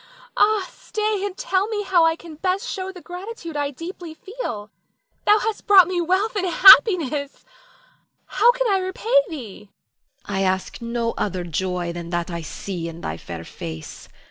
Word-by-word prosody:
Nina. - - -23
Ah, 420 -3 +3
stay 425 -2 -2
and 395 -2 -4
tell 405 -6 0
me 425 -2 -2
how 335 -4 +3
can 335 0 -12
I - - -10
best 380 +7 -1
show 380 -1 -4
the 365 -2 -12
gratitude 360 -2 -8
I 290 -1 -1
deeply 330 +3 -8
feel. 240 - -6 0.6
Thou 420 +1 +7
hast 440 0 -3
brought 385 -4 +8
me 360 -1 -1
wealth 380 +6 0
and 375 -2 0
happiness, 330 - +5 0.8
how 480 - +4
can - - -2
I 385 - +3
repay 375 +5 -4 0.2
thee? 220 - -9 0.6
Hagar. 205 - -4
I 190 - 0
ask 190 +4 -1
no 235 0 -2
other 185 -3 -2
joy 175 +1 -2
than 170 -1 -7
that 175 0 -2
I 170 0 -4
see 170 +1 -6
in 165 +1 -10
thy 80 - -4
fair 85 0 -8
face. 80 -1 -9
335 Hz, 175 wpm, -22 LUFS, -, 0.8 s, brought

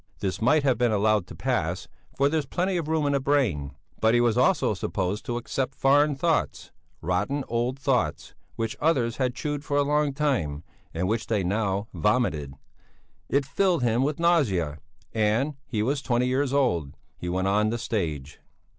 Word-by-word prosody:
This 95 +1 -3
might 145 +6 +4
have 130 -5 +2
been 120 -2 +3
allowed 105 -2 +2
to - - -10
pass, 90 -10 -1 0.3
for 140 - +4
there's 150 -1 -1
plenty 185 +4 -1
of 170 -4 -2
room 160 -1 +1
in 145 - +1
a 140 - +2
brain. 125 - 0 0.2
But 110 +1 +3
he - - +4
was 120 -2 +3
also 130 - +3
supposed 95 +1 -3
to 120 - -1
accept 130 +2 -3
foreign 145 +2 +3
thoughts, 165 +3 -1 0.3
rotten, 105 - -1
old 120 +3 -1
thoughts, 135 - -1 0.2
which 115 -1 -3
others 130 -7 +1
had 125 -2 0
chewed 145 +3 -3
for 145 -2 -1
a 145 - +4
life 145 -1 +1
time, 100 - -1 0.3
and 90 +3 -2
which 110 +2 -1
they 105 -4 0
now 100 +1 -1
vomited. 85 - 0 0.7
It 140 0 +2
filled 175 +1 +1
him 120 0 +2
with 145 +3 -1
nausea 100 - +2 0.3
and 115 +7 +1
he 110 -5 -1
was 135 +4 0
twenty 125 -2 +1
years 130 +2 0
old 90 - 0 0.2
he 90 - -4
went 95 +2 0
on 105 +2 +2
the 115 - -1
stage. 80 - -3
120 Hz, 180 wpm, -26 LUFS, 100-140 Hz, 0.7 s, might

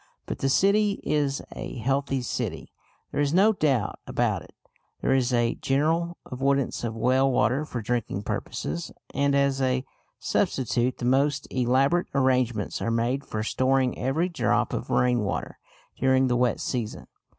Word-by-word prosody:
But - - -5
the 135 - +1
city 200 +6 +3
is 145 -2 0
a - - -6
healthy 135 +2 0
city; - - -4 0.4
there - - 0
is 145 +2 +1
no 210 +4 +5
doubt 135 - 0
about - - 0
that. - - -15 0.5
There - - +1
is 130 -1 +2
a 120 -1 +2
general 165 +5 0
avoidance 135 0 0
of 115 -1 -3
well 130 +4 +3
water 130 +5 +2
for 120 -6 -5
drinking 110 -3 -2
purposes, 85 -4 -4 0.2
and 140 0 +2
as 140 -1 +2
a 130 0 +1 0.3
substitute 125 0 0
the 120 - -4
most 140 +3 +2
elaborate 135 +7 +2
arrangements 125 -5 +1
are - - -1
made 120 +4 0
for 110 0 -4
storing 130 +2 +1
every 140 +7 0
drop 170 -4 0
of - - -4
rain 125 -1 +3
water 100 -3 -3 0.4
during 130 0 +3
the 125 -1 +1
wet 120 -1 +1
season. 120 -5 -3
130 Hz, 155 wpm, -26 LUFS, 120-140 Hz, 0.5 s, no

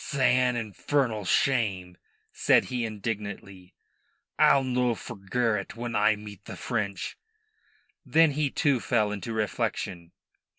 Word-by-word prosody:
"'San 130 -4 +2
infern'l 115 +1 -1
shame," 100 -10 +1 0.4
said - - +3
he 125 -2 -2
indignantly. 100 -3 -6 0.6
"I'll 135 - +6
no 125 -2 +1
forgerrit 105 -1 -2
when 120 0 -4
I... 110 - +4
meet 105 -1 -11
the - - -8
French." 100 -6 -3 0.8
Then 165 -1 +4
he 145 0 0
too 140 -2 +1
fell 110 -3 +1
into 105 +2 -5
reflection. 95 -5 -2
110 Hz, 115 wpm, -27 LUFS, 100-125 Hz, 0.8 s, I'll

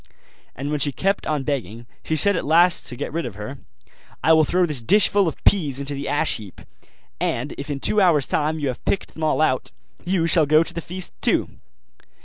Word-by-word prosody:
And 140 +3 -4
when 150 - -1
she 145 +1 +1
kept 195 +8 -1
on 150 -3 -1
begging, 120 -5 -4 0.2
she 160 - -1
said 200 +6 +2
at - - -2
last, 170 +3 +3
to - - -6
get 145 +3 -5
rid 165 +1 -2
of 115 -8 -6
her, 105 +7 -8 0.6
'I 160 - +5
will 160 -1 +5
throw 180 +3 +2
this 150 -7 -3
dishful 200 - +4
of 160 - -2
peas 150 -9 +2
into 140 +1 -3
the 140 0 -5
ash 145 - +1
heap, 105 -5 -12 0.6
and 125 +5 -2
if 140 +2 -7
in 140 -1 -3
two 210 +8 +2
hours' 160 -7 +4
time 155 +1 -1
you 145 -3 -2
have 125 - -6
picked 195 - -2
them 160 - -7
all 155 0 +1
out, 130 -4 +1 0.3
you 180 -2 0
shall 160 -2 +4
go 155 +2 +5
to - - -4
the 170 - -4
feast 180 +2 -5
too. - - +1
155 Hz, 220 wpm, -22 LUFS, 140-170 Hz, 0.6 s, I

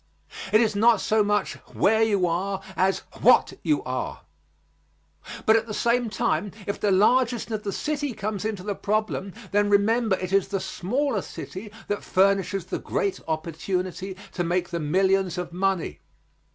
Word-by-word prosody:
It 215 - +6
is 215 -3 +1
not 225 +1 +5
so 215 +2 +2
much 210 0 0 0.2
where 220 +2 +3
you 205 -4 +3
are 190 +3 -1
as 190 +2 +1 0.2
what - - +5
you 300 - +1
are. - - -4 1.2
But 220 - +6
at 225 0 +1
the 215 - -4
same 235 0 +1
time 205 0 -1
if 200 - -3
the 205 - +1
largeness 235 +5 +3
of 215 -1 -2
the 205 -2 -3
city 290 +2 -2
comes 210 -1 -3
into 215 -4 -3
the 205 +1 -2
problem, 210 -1 -1 0.2
then 205 0 +2
remember 215 +1 +3
it 185 0 -5
is 195 -1 +3
the 195 0 -2
smaller 240 +5 -1
city 205 +4 -8 0.2
that 205 - -2
furnishes 195 -1 +2
the - - -4
great 200 -1 -2
opportunity 180 +4 -3
to 175 - -2
make 175 +1 0
the 170 - -3
millions 190 +3 +1
of 180 -1 -4
money. 190 -1 -1
200 Hz, 165 wpm, -25 LUFS, 185-220 Hz, 1.2 s, It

